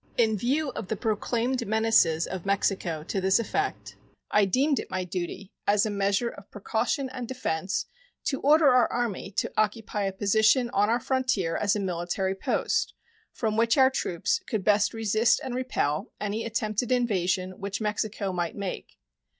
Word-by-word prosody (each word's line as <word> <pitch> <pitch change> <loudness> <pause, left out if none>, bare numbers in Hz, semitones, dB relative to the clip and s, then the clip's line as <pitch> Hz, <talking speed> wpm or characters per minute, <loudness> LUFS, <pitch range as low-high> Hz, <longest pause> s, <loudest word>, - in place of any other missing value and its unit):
In 220 -2 +3
view 275 +8 0
of 220 - -6
the 220 - -1
proclaimed 235 +3 -1
menaces 220 -7 +3
of 185 -2 -5
Mexico 190 -5 0
to 190 +4 -2
this 190 +1 +4
effect, 395 - -3 0.3
I 210 -1 +4
deemed 270 +9 +2
it - - -6
my 185 -1 -2
duty, 180 +2 -5 0.2
as 205 +1 +4
a 215 - -1
measure 200 +3 +1
of 200 - -13
precaution 225 +7 -1
and 255 -2 -6
defense, 200 -6 -2 0.4
to 270 - -1
order 300 +2 +5
our 250 -1 +4
Army 235 -6 -2
to - - -1
occupy 210 -1 0
a 195 - 0
position 220 +5 +3
on 205 +2 +2
our 235 +2 +2
frontier 250 -10 0
as 205 +3 +1
a - - -1
military 185 +1 -1
post, 195 - -1 0.4
from 220 -2 -2
which 230 +2 +3
our 265 -1 +6
troops 175 -9 -1
could 215 -4 -2
best 210 +1 +3
resist 225 +1 +2
and 255 - -4
repel 245 - -1
any 210 +2 -2
attempted 225 +1 -1
invasion 185 -6 0
which 200 0 -4
Mexico 210 -2 -2
might 175 -2 -2
make. 200 -2 -6
210 Hz, 165 wpm, -27 LUFS, 190-240 Hz, 0.4 s, our